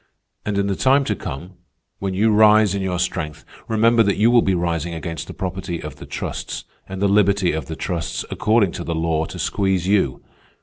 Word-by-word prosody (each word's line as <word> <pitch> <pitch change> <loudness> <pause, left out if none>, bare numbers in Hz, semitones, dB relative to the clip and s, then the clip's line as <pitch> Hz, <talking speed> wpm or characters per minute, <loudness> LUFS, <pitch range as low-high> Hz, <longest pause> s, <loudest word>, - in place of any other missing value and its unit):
And 105 -1 -1
in 100 - +1
the 100 -1 -1
time 135 +5 +3
to - - 0
come, 85 +7 -7 0.4
when 95 -1 -3
you 110 +3 +3
rise 105 -1 +5
in 100 - -2
your 95 -2 -1
strength, 80 -4 -3 0.2
remember 115 +1 +4
that 100 -2 +2
you 110 +4 +4
will 120 -1 +6
be 95 -3 +1
rising 85 -1 -2
against 80 -2 -5
the - - -8
property 90 -2 -4
of 75 -2 -8
the - - -11
trusts, - - -5 0.3
and 95 0 -5
the - - +4
liberty 100 -2 +3
of 80 +1 -4
the 80 - -5
trusts, 85 -1 -3
according 105 -4 +2
to - - -6
the 85 - -3
law, 80 -1 0
to - - -9
squeeze 95 -3 0
you. 95 -11 +1
95 Hz, 210 wpm, -21 LUFS, 85-105 Hz, 0.4 s, will